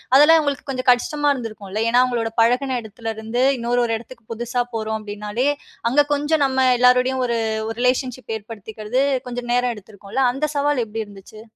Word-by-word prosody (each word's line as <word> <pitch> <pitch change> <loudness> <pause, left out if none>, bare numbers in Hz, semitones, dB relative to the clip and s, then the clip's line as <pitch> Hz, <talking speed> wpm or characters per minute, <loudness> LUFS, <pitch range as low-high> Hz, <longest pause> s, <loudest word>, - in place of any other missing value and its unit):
அதெல்லாம் 300 +4 +8
அவுங்களுக்கு 285 -2 -3
கொஞ்சம் 255 -1 0
கஷ்டமா 290 +4 +1
இருந்திருக்கும்ல! 215 -4 -5
ஏன்னா, 245 +2 +5
அவுங்களோட 235 -3 -1
பழகின 250 +3 +2
எடத்துல 225 +1 -6
இருந்து 225 +3 -2 0.2
இன்னொரு 240 +1 0
ஒரு 225 -1 0
எடத்துக்கு 235 0 -14
புதுசா 240 +2 -2
போறோம் 220 0 -2
அப்படின்னாலே, 210 +4 -3 0.4
அங்க 290 +4 +4
கொஞ்சம் 295 +1 +1
நம்ம 265 -1 +2
எல்லாருடையும் 250 +1 +3
ஒரு 235 -1 0 0.3
ஒரு 225 - -6
ரிலேஷன்ஷிப் 250 -1 -1
ஏற்படுத்திக்கிறது 220 +2 -4 0.3
கொஞ்சம் 245 -1 -4
நேரம் 245 0 +1
எடுத்திருக்கும்ல, 205 +4 -4
அந்த 290 +4 -1
சவால் 285 -3 +1
எப்படி 220 +1 -4
இருந்துச்சு? 205 +1 -13
245 Hz, 160 wpm, -21 LUFS, 220-260 Hz, 0.4 s, அதெல்லாம்